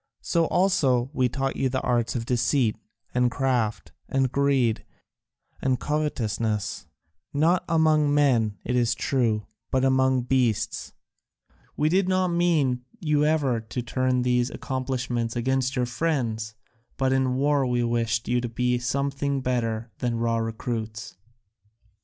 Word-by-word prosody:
So 170 -1 +2
also 135 -10 +2
we 125 -3 +2
taught 135 +2 -2
you 130 - +1
the 130 +1 -1
arts 120 -1 0
of 115 -2 -2
deceit 120 -1 +1 0.4
and 125 0 +3
craft 125 -4 -1 0.2
and 135 -2 +1
greed 135 -5 +1 0.8
and 130 -2 +1
covetousness, 110 - -2 0.5
not 165 +5 +3
among 155 -2 +3
men 120 -8 +2
it 125 - -1
is 120 -2 +2
true, 115 -6 0 0.2
but 130 0 +1
among 130 -1 +3
beasts; 120 -4 0 0.8
we 150 - +2
did 185 +3 +2
not 185 -1 +2
mean 160 -8 +1 0.2
you 150 -5 +2
ever 145 -6 +1
to 110 +2 -5
turn 125 +1 0
these 125 0 +2
accomplishments 125 -4 -3
against 130 +2 0
your 125 -1 +1
friends, 120 -6 -2 0.4
but 130 -1 +2
in 130 -1 +1
war 140 0 +2
we 120 -1 +1
wished 115 -1 0
you 120 0 +1
to 120 - -3
be 125 +1 0
something 140 +3 -1
better 115 -3 -2
than 120 -2 -1
raw 115 0 0
recruits." 110 -1 -4
125 Hz, 135 wpm, -25 LUFS, 115-140 Hz, 0.8 s, and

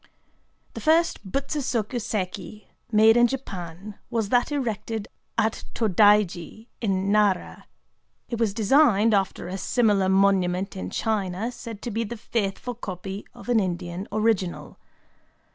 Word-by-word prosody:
The - - -7
first 320 - +2
Butsu 275 +2 -1
soku 240 -3 -1
séki 210 -2 -4 0.3
made 220 +1 +6
in 240 0 +6
Japan 195 -6 -7
was 220 -3 -1
that 245 +4 +2
erected 225 -5 -2 0.3
at 225 -1 0
Tōdaiji, 210 -2 +3 0.2
in 195 -2 0
Nara. 205 -3 +1 0.6
It 235 - -4
was 215 -4 +1
designed 225 -2 +4
after 195 -2 0
a 190 +2 -5
similar 205 -3 +2
monument 190 -1 +2
in 190 - -5
China, 210 0 -1
said 230 -4 -9
to 240 - -3
be 225 +2 -1
the 230 +2 -6
faithful 215 +2 -2
copy 195 -2 -7
of - - -12
an 240 -2 +3
Indian 180 0 -3
original. 215 -4 -1
210 Hz, 130 wpm, -25 LUFS, 195-230 Hz, 0.6 s, made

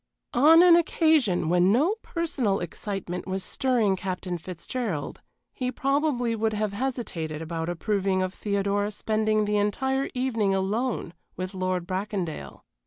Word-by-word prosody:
On 315 +7 +7
an 350 -2 +8
occasion 315 - +3
when 180 +2 +4
no 295 - +3
personal 270 - -1
excitement 180 +1 -5
was 190 0 -2
stirring 230 -4 +1
Captain 180 -2 -4
Fitzgerald 180 - -4 0.3
he 255 -1 -2
probably 270 -3 0
would 220 0 0
have 210 -1 -1
hesitated 200 - -3
about 165 +1 -4
approving 190 +1 0
of 185 0 -3
Theodora 200 0 0
spending 215 0 0
the 210 0 +1
entire 265 +7 0
evening 230 -6 +1
alone 210 0 -1 0.2
with 185 +2 -4
Lord 185 -1 -1
Bracondale. 185 - -4
205 Hz, 130 wpm, -26 LUFS, 185-250 Hz, 0.3 s, an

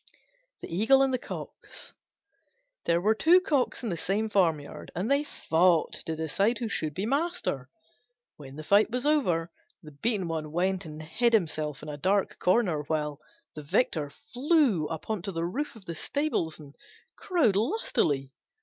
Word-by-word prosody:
THE 165 - -6
EAGLE 265 +8 +5
AND 265 -1 +1
THE 255 - +1
COCKS - - -7 0.9
There 170 0 +3
were 210 +5 +3
two 330 +11 +5
Cocks 290 -9 0
in 230 - -2
the 175 - -1
same 200 +6 -1
farmyard, 165 -8 0
and 195 +9 -1
they 280 +1 +3
fought 170 - +2
to 160 - -1
decide 195 +9 0
who 235 -3 -3
should 155 -7 -2
be 195 - -2
master. 280 - -1 0.7
When 135 -2 -11
the 155 - -7
fight 205 +6 +4
was 250 +3 -1
over, 180 - +2 0.3
the 155 - -11
beaten 190 +5 -1
one 155 -2 -3
went 185 +3 0
and 155 0 -8
hid 235 +10 +1
himself 155 -8 0
in 155 - -7
a 145 - -5
dark 190 +6 0
corner; 180 -6 +2
while 150 -1 -2 0.3
the 155 - -7
victor 155 - 0
flew 250 - +1
up 160 -1 -6
on 215 -4 -2
to 195 - -4
the 165 -1 -2
roof 275 +12 -3
of 215 -4 -14
the 170 - -4
stables 175 - -1
and 145 -2 -13 0.4
crowed 310 - +2
lustily. 195 - 0
185 Hz, 170 wpm, -28 LUFS, 155-240 Hz, 0.9 s, EAGLE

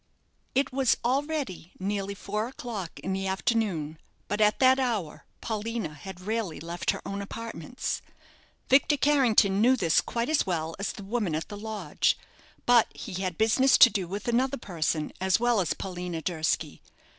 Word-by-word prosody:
It 270 -1 +1
was 265 -2 +3
already 270 - -1
nearly 200 +1 -2
four 210 +3 -3
o'clock 225 -8 -6
in 190 - -2
the 195 0 -2
afternoon; 190 -6 -1 0.3
but 205 +1 -1
at 210 0 +4
that 260 0 +5
hour 220 - -2 0.2
Paulina 220 -6 -3
had 180 +5 -9
rarely 215 -6 -2
left 170 +3 -4
her - - 0
own 200 0 -3
apartments. 230 +1 -5 0.7
Victor 285 +2 +4
Carrington 235 -9 +4
knew 250 +3 +5
this 170 -9 +3
quite 235 0 -2
as 310 -1 +2
well 165 -3 -2
as 200 - -1
the 205 - -9
woman 200 -5 -1
at 160 - -4
the 205 - -6
lodge, 205 -6 -1 0.5
but 240 -2 +6
he 185 +1 -5
had 185 -3 -2
business 245 +5 +4
to 245 - +9
do 190 -3 -2
with 200 +6 -5
another 255 +3 +1
person 160 -6 -2
as 190 +1 +3
well 240 -3 +3
as 170 - -1
Paulina 180 -3 -5
Durski. 160 -2 -1
205 Hz, 165 wpm, -28 LUFS, 180-240 Hz, 0.7 s, to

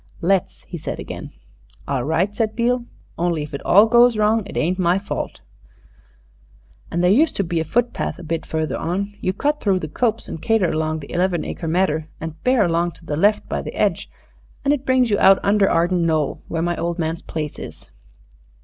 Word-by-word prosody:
"Let's," 185 +1 0
he 170 - -8
said - - -5
again. - - -7 0.6
"All 135 -3 -1
right," 170 +8 0
said 220 -1 -1
Beale, 240 +1 +1 0.3
"only 170 -3 0
if 150 - -9
it 140 - -5
all 205 +4 +6
goes 240 0 +5
wrong 215 +1 +3
it - - -7
ain't 180 +4 0
my 175 0 +3
fault 195 - -5 1.5
an' 170 - 0
there 180 +1 +4
used 300 +10 +3
to 200 - 0
be 170 -2 -1
a - - 0
foot 235 +9 0
path - - -3
a 180 - -10
bit 165 0 -3
further 160 -1 -2
on. 200 +4 -2
You 185 - +1
cut 295 +10 -1
through 195 -3 +2
the 155 - -4
copse 225 - -1
and 160 - -7
cater 225 -5 +2
across 155 0 -1
the 140 - -10
eleven 175 -1 0
acre 165 - -5
medder, 160 -2 0
and 160 0 -7
bear 250 -3 +3
along 170 0 0
to - - -18
the 150 - -2
left 205 +7 +2
by - - -2
the - - -6
hedge - - 0 0.6
an' 280 - +4
it 285 -2 -1
brings 255 -3 +3
you 205 - +2
out 195 0 +7
under 200 -1 +3
Arden 175 +1 +2
Knoll, 155 -3 0
where 165 -1 -2
my 175 0 0
old 170 +1 -2
man's 165 -1 -2
place 150 -2 -5
is." - - -10
180 Hz, 210 wpm, -21 LUFS, 160-210 Hz, 1.5 s, out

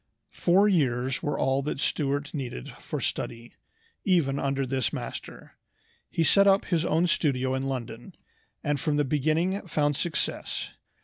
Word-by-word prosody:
Four 190 +4 +4
years 130 -8 +1
were 145 - -1
all 135 +1 +1
that 140 0 -3
Stuart 145 -1 -1
needed 125 - -5
for - - -4
study, 115 +1 -4 0.5
even 155 -8 +2
under 135 0 0
this 130 -1 0
master. - - -7 0.5
He 165 - +1
set 200 +5 +5
up 195 0 +4
his 170 -3 +1
own 165 +3 +3
studio 130 -6 +1
in 130 +1 -1
London, 125 - -5 0.5
and 145 -2 0
from 150 +1 0
the 145 - +2
beginning 155 +8 +1
found 145 -3 +1
success. 155 0 -2
145 Hz, 145 wpm, -27 LUFS, 130-165 Hz, 0.5 s, set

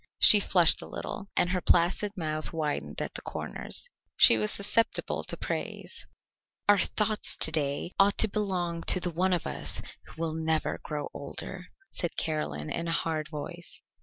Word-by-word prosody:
She 210 - +9
flushed 180 -4 +4
a - - -8
little, 200 -2 -5
and 175 - +3
her 180 -1 0
placid 180 +5 +2
mouth 155 -2 -3
widened 155 -3 -3
at - - -6
the - - -5
corners. - - -5 0.3
She - - +8
was 215 - +1
susceptible 210 +3 +1
to - - -3
praise. - - -5 0.6
"Our 205 -1 +6
thoughts 215 +1 0
to 160 - +4
day 145 +2 -1
ought 200 +1 +4
to 220 - +5
belong 185 -5 -2
to 185 - +6
the 180 -1 -3
one 185 +3 +1
of 175 -3 0
us - - -2 0.3
who - - -15
will 165 -1 -2
never 160 0 -1
grow 150 -2 -4
older," 180 +6 -7 0.2
said 175 - -2
Caroline 75 - -2
in 170 0 -3
a - - -1
hard 160 -2 -1
voice. 165 +2 -7
170 Hz, 170 wpm, -28 LUFS, 155-195 Hz, 0.6 s, She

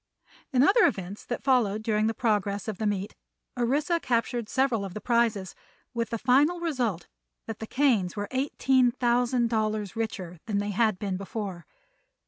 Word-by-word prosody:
In 260 -1 +4
other 415 +9 +6
events 195 +2 -4
that 245 - -4
followed 220 -6 +2
during 215 -1 +1
the 225 - -1
progress 205 -4 0
of 215 -4 -4
the 215 - 0
meet 200 -1 -2 0.4
Orissa 285 +8 +1
captured 235 -3 -1
several 260 -6 +1
of 195 -2 -7
the - - -3
prizes, 230 -5 +1 0.4
with 230 -1 -2
the 230 - -2
final 280 +9 +3
result 250 - -2 0.4
that 225 -1 -6
the 220 - -6
Kanes 235 -11 +2
were 205 -1 -3
eighteen 260 -1 +2
thousand 240 0 +1
dollars 215 -2 -1
richer 185 -6 -4
than 210 -2 0
they 205 0 -1
had 215 -1 +2
been 195 -1 -3
before. 195 -3 -6
225 Hz, 165 wpm, -27 LUFS, 205-250 Hz, 0.4 s, other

